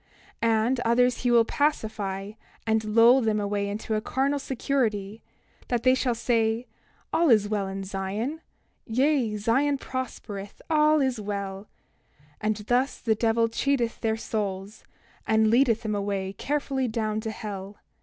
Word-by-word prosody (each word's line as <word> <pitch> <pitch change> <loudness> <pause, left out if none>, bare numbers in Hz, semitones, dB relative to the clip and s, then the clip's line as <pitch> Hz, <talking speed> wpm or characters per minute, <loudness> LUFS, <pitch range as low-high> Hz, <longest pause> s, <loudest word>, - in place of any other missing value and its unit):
28:21 230 - +3 0.2
And 255 +1 +1
others 245 +1 +2
will 240 -1 +5
he - - +1
pacify, 210 -9 -1 0.3
and 220 -1 +1
lull 230 +4 +6
them 220 -2 +1
away 200 0 -1
into 215 +1 -2
carnal 275 +5 0
security, 230 -6 -1 0.5
that 240 -2 -1
they 255 0 +5
will 245 -3 +1
say: 230 0 +1 0.5
All 335 -1 +3
is 215 -4 +5
well 205 -2 -1
in 195 0 -5
Zion; 200 - -3 0.5
yea, 255 -2 +1
Zion 270 +7 +2
prospereth, 215 -7 -6
all 305 -1 +4
is 260 -4 0
well—and 200 -3 -6
thus 255 +3 +1
the 225 - +1
devil 230 +1 +2
cheateth 235 0 0
their 220 -1 0
souls, 205 -2 -4 0.4
and 220 0 +3
leadeth 235 -2 +3
them 215 -1 -2
away 200 -1 -2
carefully 275 +1 -1
down 215 -1 -1
to 220 - -4
hell. 205 -2 -7
225 Hz, 140 wpm, -26 LUFS, 205-255 Hz, 0.5 s, lull